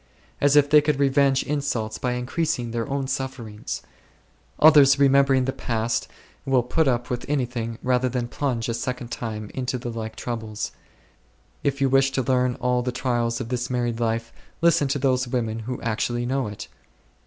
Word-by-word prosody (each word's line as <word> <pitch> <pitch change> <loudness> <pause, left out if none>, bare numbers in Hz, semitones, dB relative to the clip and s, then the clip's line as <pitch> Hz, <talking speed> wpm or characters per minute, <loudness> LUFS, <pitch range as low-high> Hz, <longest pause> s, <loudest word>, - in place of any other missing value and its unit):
As 145 0 +4
if 145 -1 +6
they 150 0 +6
could 150 -1 0
revenge 135 -1 +3
insults 140 -7 -2
by 125 -1 -1
increasing 125 -1 -2
their 115 +3 -3
own 140 0 -1
suffer 130 -3 -4
ings! 105 0 -6 0.8
Others, 145 -3 +7
remembering 135 -1 +4
the 135 - 0
past, 115 -1 -1 0.4
will 130 -2 +2
put 155 +5 +1
up 120 +1 0
with 120 - -2
anything 120 -5 -2
rather 125 0 +2
than 125 -1 -2
plunge 125 -3 -2
a 115 - -1
second 125 0 -4
time 110 -3 -5
into 125 -1 -2
the 120 0 -5
like 110 -1 -5
troubles. 110 -1 -4 0.9
If 140 0 -1
you 135 - +4
wish 135 +1 +4
to 130 - 0
learn 125 -1 +1
all 125 0 0
the 125 0 -2
trials 120 -2 -1
of 115 - -5
this 125 -1 -2
married 120 -2 -1
life, 115 0 -1 0.3
listen 165 -3 +3
to 140 - 0
those 130 -2 +1
women 115 -3 -2
who 120 +3 -5
actually 120 +1 -1
know 130 -1 -1
it. 105 -1 -7
125 Hz, 175 wpm, -24 LUFS, 115-135 Hz, 0.9 s, Others